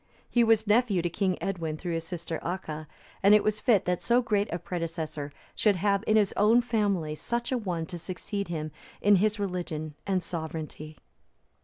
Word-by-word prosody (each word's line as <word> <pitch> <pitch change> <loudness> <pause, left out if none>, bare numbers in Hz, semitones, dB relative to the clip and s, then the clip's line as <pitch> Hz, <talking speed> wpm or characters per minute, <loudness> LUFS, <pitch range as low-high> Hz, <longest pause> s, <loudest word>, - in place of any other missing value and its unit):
He 240 - +3
was 225 -1 +4
nephew 210 -4 +3
to 175 - -1
King 185 0 0
Edwin 165 -5 -2
through 175 +1 -4
his 165 0 -2
sister 170 -2 -4
Acha; 155 -4 -4 0.3
and 200 +2 +7
it 210 - +4
was 215 0 0
fit 215 -6 +3
that 180 -1 0
so 240 +1 +3
great 210 -4 0
a 170 - -1
predecessor 160 -4 -4 0.2
should 210 -3 +3
have 200 +2 +1
in 215 - +4
his 210 -3 +3
own 225 +4 +5
family 200 -9 0
such 235 - -3
an 250 -3 0
one 170 -4 -2
to 175 +2 -7
succeed 195 +4 -4
him 155 -2 -4 0.3
in 205 -1 +5
his 210 +2 +2
religion 175 -6 -3
and 190 -2 +1
sovereignty. 160 -2 -6
185 Hz, 185 wpm, -28 LUFS, 165-210 Hz, 0.3 s, and